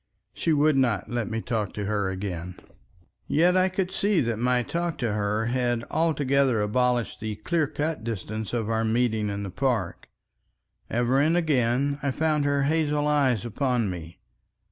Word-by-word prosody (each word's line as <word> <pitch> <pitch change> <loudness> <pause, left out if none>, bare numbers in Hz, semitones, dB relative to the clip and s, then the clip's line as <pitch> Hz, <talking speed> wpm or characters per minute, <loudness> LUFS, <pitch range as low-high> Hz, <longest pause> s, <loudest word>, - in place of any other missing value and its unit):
She 165 - -1
would 150 -1 +3
not 120 -8 +1
let 120 -3 -2
me 115 0 -2
talk 110 -5 -2
to 105 - -4
her 100 -2 0
again. 90 -2 -5 0.7
Yet 175 +4 +3
I 185 0 +4
could 185 0 -2
see 200 0 +1
that 115 -3 -1
my 125 0 +2
talk 170 +4 -2
to 115 -5 -1
her 105 +1 0
had 120 -1 0
altogether 140 -6 +2
abolished 120 +3 0
the 110 -1 -4
clear 155 +8 0
cut 150 -3 -3
distance 110 -1 -4
of 115 -3 -1
our 110 0 0
meeting 110 -2 +1
in 100 0 -3
the 95 - -5
park. 125 +1 -1 0.8
Ever 120 +3 +1
and 160 +4 +3
again 140 -3 +1
I 140 - 0
found 150 +1 +1
her 140 -1 +2
hazel 150 0 +1
eyes 135 -8 +2
upon 120 -2 0
me. 85 -1 -8
125 Hz, 165 wpm, -26 LUFS, 110-145 Hz, 0.8 s, I